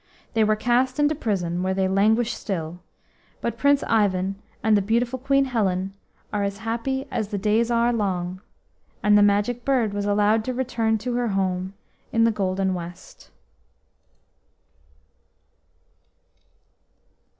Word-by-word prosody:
They 225 -2 +3
were 215 0 +3
cast 250 +4 +1
into 295 +1 +3
prison, 185 - -2
where 190 +1 0
they 190 0 +1
languish 220 +5 +2
still: 175 -4 -4 0.6
but 235 - -2
Prince 280 +4 +3
Ivan 195 -2 +1 0.2
and 220 -1 +4
the 205 - +3
beautiful 235 +5 0
Queen 275 +1 +2
Helen 195 -6 -1 0.4
are 205 - 0
as 200 0 -2
happy 265 +4 -2
as 215 - -1
the 205 0 -3
days 215 +4 +1
are 235 0 +2
long, 185 -4 -2 0.6
and 210 0 +5
the 205 - +6
Magic 205 +4 +2
Bird 245 -6 +1
was 205 0 -2
allowed 210 +2 +3
to 255 - -2
return 230 -3 0
to 240 +3 -4
her 245 -1 0
home 190 -1 -1 0.4
in 230 - +3
the 230 - +4
golden 190 -2 -1
west. 175 0 -9
215 Hz, 140 wpm, -24 LUFS, 195-235 Hz, 0.6 s, the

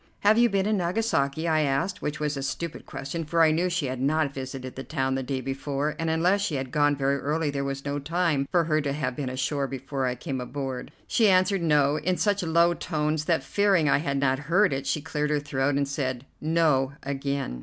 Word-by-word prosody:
"Have 215 +3 +5
you 240 0 +5
been 195 -2 +1
in 215 0 +1
Nagasaki?" 170 -5 0
I 155 -1 +3
asked, 155 +7 0
which 150 +1 -3
was 150 -1 -1
a 135 - -4
stupid 165 +4 -4
question, 140 +5 -5
for 165 +2 +2
I 160 - +5
knew 175 +3 +1
she 175 -4 -1
had 130 -1 -3
not 145 +1 +1
visited 130 -1 -6
the 135 - -6
town 135 -3 -1
the 135 - -1
day 130 0 -3
before, 140 +3 -2
and 165 0 -1
unless 175 +5 +2
she 185 -7 -1
had 130 -2 -3
gone 145 -1 +3
very 140 0 +1
early 150 +1 -1
there 140 -1 -2
was 140 0 -4
no 145 0 -2
time 155 -2 0
for 175 -2 +3
her 155 -1 +1
to 140 -1 -2
have 130 -4 -2
been 135 -2 -3
ashore 135 +2 -1
before 135 0 -3
I 125 - -1
came 130 +1 -4
aboard. 130 0 -5 0.2
She 220 -3 +3
answered 185 0 +3
"No" 150 -3 +3
in 175 +4 0
such 205 -1 +1
low 170 0 +3
tones 155 -2 -1
that, 160 -5 +1
fearing 195 0 +2
I 145 - +4
had 140 -2 -1
not 135 -1 +1
heard 190 -1 +4
it, 135 0 -3
she 155 - 0
cleared 150 +1 -2
her 150 -1 +1
throat, 140 -1 -1
and 140 0 +1
said 130 -2 -3 0.2
"No" 150 -4 +2
again. 140 - -3
145 Hz, 230 wpm, -26 LUFS, 135-165 Hz, 0.2 s, Have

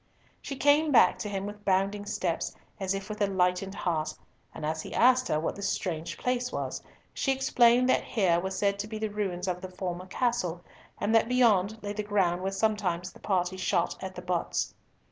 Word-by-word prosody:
She 275 - -5
came 290 +3 +4
back 250 - +5
to 210 - -3
him 195 -1 -3
with 205 0 -8
bounding 200 +1 +1
steps, 175 -4 -2 0.2
as 190 0 -1
if 195 -1 -5
with 215 0 -6
a 205 - +4
lightened 185 0 0
heart, 155 -3 -1 0.4
and 155 - -6
as 160 +1 -1
he - - -7
asked 255 +1 +5
her 155 - +1
what 160 - -2
this 200 0 -2
strange 170 -2 -3
place 250 0 -1
was, - - -3 0.3
she 270 - 0
explained 250 -2 +4
that - - +3
here 185 -7 +2
were 190 +2 -2
said 200 +1 0
to 205 - -3
be 215 0 -5
the 215 -1 -2
ruins 190 -3 -2
of 180 -1 -2
the 185 - -6
former 180 0 -5
castle, 185 -6 -1 0.4
and 210 +2 0
that 225 +1 +4
beyond 220 -5 +3
lay 205 0 -3
the 210 - -2
ground 195 -4 +1
where 190 +1 -1
sometimes 195 -4 0
the - - -16
party 185 -2 0
shot 175 -2 0
at 190 0 -6
the 180 - -7
butts. 180 -1 -1
195 Hz, 205 wpm, -29 LUFS, 180-220 Hz, 0.4 s, back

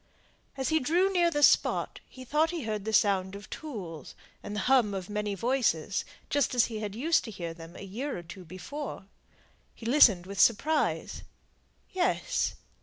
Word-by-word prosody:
As 265 - -1
he 315 0 +3
drew 355 +8 +2
near 345 -2 +4
the 295 -3 0
spot - - +3
he 255 0 -11
thought 305 +5 +2
he 335 -4 -4
heard 215 -2 -3
the 220 - -2
sound 195 -3 +2
of 205 +1 -10
tools, 185 - -7 0.3
and 205 - -6
the 210 - -1
hum 245 -5 +3
of 190 +1 -6
many 210 -1 -2
voices, 210 - 0 0.2
just 285 -3 +1
as 245 - +5
he 225 - -5
used 230 +11 0
to - - -6
hear 175 -5 -6
them 165 +1 -12
a - - -9
year 235 +8 -4
or 175 - -7
two 175 +3 -10
before. 190 - -7 0.7
He 225 - -12
listened 230 -8 +5
with 195 0 -7
surprise. 290 +9 +2 0.7
Yes! 365 0 0
220 Hz, 175 wpm, -29 LUFS, 195-290 Hz, 0.7 s, as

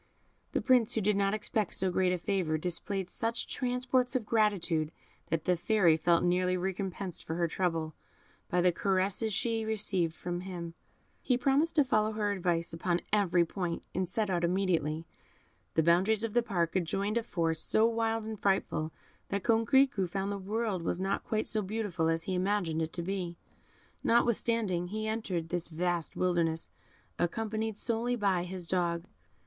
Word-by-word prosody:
The - - +1
Prince, 250 -4 +4
who 220 - +1
did 210 +1 +2
not 200 +1 +2
expect 215 -1 0
so 190 0 +1
great 185 0 +2
a 180 - +1
favour, 175 -3 0
displayed 180 +3 -3
such 230 +5 -1
transports 250 0 0
of 245 -4 0
gratitude 190 -8 +1 0.4
that 160 -1 -1
the 180 - +3
Fairy 175 -2 +3
felt 170 +1 +3
nearly 180 +1 +2
recompensed 190 -1 -3
for 160 - -4
her 170 0 +1
trouble 165 -2 -1 0.6
by 180 - +2
the 180 0 +4
caresses 195 +4 0
she 225 +2 0
received 200 -6 0
from 175 0 -4
him. 175 -3 -6 0.5
He 250 - +2
promised 280 +5 +2
to 300 - +6
follow 215 -4 +1
her 210 -1 0
advice 175 -4 -1
upon 170 +1 0
every 185 -4 +3
point, 175 0 -3
and 185 -1 -1
set 210 +1 0
out 175 -1 0
immediately. 170 -4 0 0.7
The 160 - +4
boundaries 190 +7 +3
of 225 -2 -2
the 240 - +4
park 175 -8 -1
adjoined 195 +5 0
a - - -2
forest 165 -7 -1
so 220 - +4
wild 225 -1 0
and 220 -1 -6
frightful 165 -5 0 0.4
that 200 0 -2
Coquerico 230 -3 +3
found 195 +2 -2
the 200 - -3
world 210 -1 -2
was 170 +1 -2
not 195 +1 -1
quite 215 -1 -1
so 215 - 0
beautiful 195 -5 -1
as 165 0 0
he 190 - -3
imagined 180 -3 0
it 160 0 -2
to 170 - -2
be; 180 -2 -3 0.7
notwithstanding, 230 -6 +2
he 215 +3 -3
entered 190 -7 -2
this 175 -1 -1
vast 175 0 -1
wilderness, 170 -3 0 0.5
accompanied 220 +4 -1
solely 235 +2 0
by 195 -6 +1
his 180 -1 -4
dog. 170 -1 0
190 Hz, 170 wpm, -31 LUFS, 175-220 Hz, 0.7 s, to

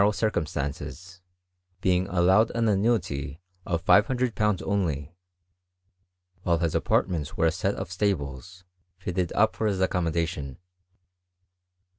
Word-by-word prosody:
row 100 +1 +5
circumstances, 90 -1 -3 0.6
being 90 0 +1
allowed 95 +4 +4
an 115 -1 +2
annuity 95 -10 0 0.3
of 85 +1 -2
£500 110 -3 +3
only; 85 -7 -1 1.3
while 85 -2 +2
his 85 -1 -1
apartments 80 -5 0
were - - +2
a 80 - +4
set - - -1
of - - -5
stableSi 90 -3 -2 0.3
fitted 90 -1 -2
up 110 +1 +3
for 110 - 0
his 100 -3 0
accommodation. 85 -6 -1
90 Hz, 110 wpm, -26 LUFS, 80-100 Hz, 1.3 s, row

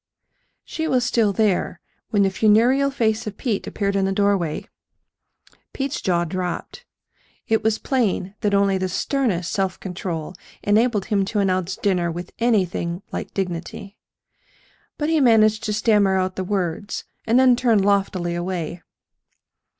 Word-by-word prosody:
She 320 0 -4
was 250 -3 +2
still 225 -4 +2
there 195 -4 0 0.3
when 205 -3 +3
the 195 - +2
funereal 235 +7 +3
face 225 -5 0
of 205 - -6
Pete 225 -7 -2
appeared 200 -1 -2
in 195 -1 +2
the 195 - 0
doorway. 195 -5 0 1.1
Pete's 275 +1 -3
jaw 175 -2 +1
dropped. 180 - -5 0.6
It 220 0 +1
was 220 0 +2
plain 210 -8 -1
that 205 -1 +1
only 200 -1 +2
the 185 0 -1
sternest 190 -5 -1
self 190 -2 -1
control 175 -3 -5 0.3
enabled 210 -1 +2
him 200 -2 +1
to 210 - -4
announce 185 -2 0
dinner, 180 -4 0
with 175 +2 -7
anything 190 -6 0
like - - -6
dignity. 190 +2 -4 1.0
But 295 +1 -1
he 320 -2 +3
managed 220 -3 +4
to 215 - -1
stammer 210 -3 +3
out 185 0 -1
the 190 - -2
words, 185 0 -3 0.2
and 235 +3 +4
then 255 -1 +6
turn 240 -2 +2
loftily 195 -3 +1
away. 175 -1 -4
200 Hz, 145 wpm, -22 LUFS, 185-225 Hz, 1.1 s, then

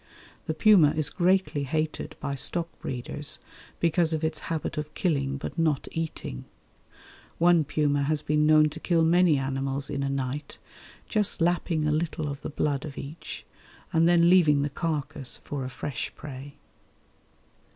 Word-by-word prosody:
The 155 - -1
puma 170 -5 +6
is 155 -3 +1
greatly 175 -5 +1
hated 155 +3 -2
by 140 - -3
stock 165 +5 0
breeders 145 +4 -3 0.4
because 165 0 +2
of 160 0 -2
its 160 0 0
habit 165 -2 -2
of 150 0 -4
killing 140 -6 0
but 150 - -6
not 155 -4 +1
eating. 160 - -5 0.9
One 170 -1 +5
puma 145 -1 +1
has 155 0 0
been 150 0 +2
known 155 0 +6
to 155 +2 -9
kill 170 -2 +2
many 170 -1 +4
animals 135 +1 -2
in 140 - -2
a 140 - -1
night, 135 +1 -3 0.5
just 210 -3 +1
lapping 165 -2 +1
a - - +2
little 155 0 -1
of 140 0 -5
the - - -5
blood 145 -1 -1
of 150 -3 -8
each 150 +4 -8 0.5
and 165 +1 +4
then 170 -1 +5
leaving 155 -6 +5
the 145 - -2
carcase 145 -3 -2
for 140 -2 -4
a 130 - -4
fresh 130 +1 -4
prey. 140 -1 -9
150 Hz, 160 wpm, -27 LUFS, 140-165 Hz, 0.9 s, puma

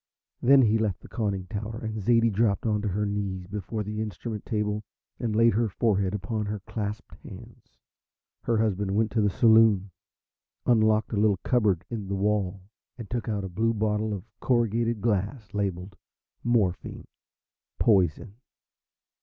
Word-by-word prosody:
Then 135 +2 +6
he 110 0 +3
left 105 -4 -1
the - - -13
conning 100 -4 -2
tower, 110 +2 -5
and 110 -1 -4
Zaidie 115 +2 +3
dropped 105 0 +1
on 105 -2 +1
to 105 - -2
her 105 +2 -1
knees 100 -3 -3
before 105 +3 -4
the 105 +1 -4
instrument 110 +1 -5
table 105 -1 -1 0.4
and 110 -3 -2
laid 115 +1 +5
her 115 +1 +1
forehead 100 -2 0
upon 105 +2 -3
her 105 0 -3
clasped 105 +1 -5
hands. - - -13 0.7
Her 115 - 0
husband 100 -3 0
went 110 +1 +1
to 115 - +1
the 105 - +3
saloon, 110 -3 +4 0.7
unlocked 110 -2 +3
a - - 0
little 105 -1 +3
cupboard 105 -8 +1
in 105 -4 -4
the 100 - -2
wall 100 -2 0 0.3
and 115 -3 -9
took 120 -1 -2
out 105 -2 -1
a - - -3
blue 110 +5 0
bottle 105 0 0
of 100 -3 -4 0.2
corrugated 115 -2 +1
glass 105 +1 -1
labelled 95 -1 -3 0.5
"Morphine, 110 -7 0 0.7
Poison." 100 +1 +2
105 Hz, 155 wpm, -27 LUFS, 100-115 Hz, 0.7 s, Then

